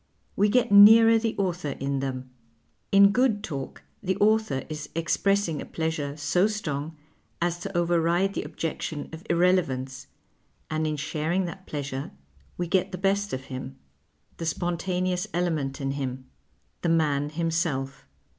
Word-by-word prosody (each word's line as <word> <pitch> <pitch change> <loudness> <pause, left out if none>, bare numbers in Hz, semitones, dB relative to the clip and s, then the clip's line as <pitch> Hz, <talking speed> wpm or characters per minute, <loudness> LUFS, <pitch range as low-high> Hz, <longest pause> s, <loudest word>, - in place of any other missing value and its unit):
We 205 +1 +3
get 245 0 +2
nearer 225 +3 +8
the 225 0 -2
author 180 -6 -2
in 140 0 -1
them; 130 -1 -4 0.6
in 200 0 +7
good 225 -3 +2
talk 140 -8 -6 0.2
the 190 -1 -1
author 215 -9 +2
is 155 -1 -6
expressing 170 0 +1
a - - -6
pleasure 155 -3 -3
so 180 +6 +2
strong 160 -7 -4 0.4
as 175 0 -1
to 195 0 -4
override 175 +2 +2
the - - -2
objection 155 -2 -4
of 160 +2 -8
irrelevance, 135 -7 +1 0.6
and 155 0 0
in 155 - -1
sharing 160 +6 -1
that 190 +2 -8
j)lcasure 140 -2 -4 0.5
we 175 - -1
get 185 +2 +1
the 185 - -4
best 200 +2 0
of 130 - -4
him, 130 +1 -6 0.6
the 165 - -4
spontaneous 180 +2 -1
element 155 -6 -1
in 135 -1 -2
him, 130 -2 -4 0.6
the 170 - 0
man 150 -3 +2
himself. 155 -5 -2
170 Hz, 145 wpm, -26 LUFS, 145-190 Hz, 0.6 s, nearer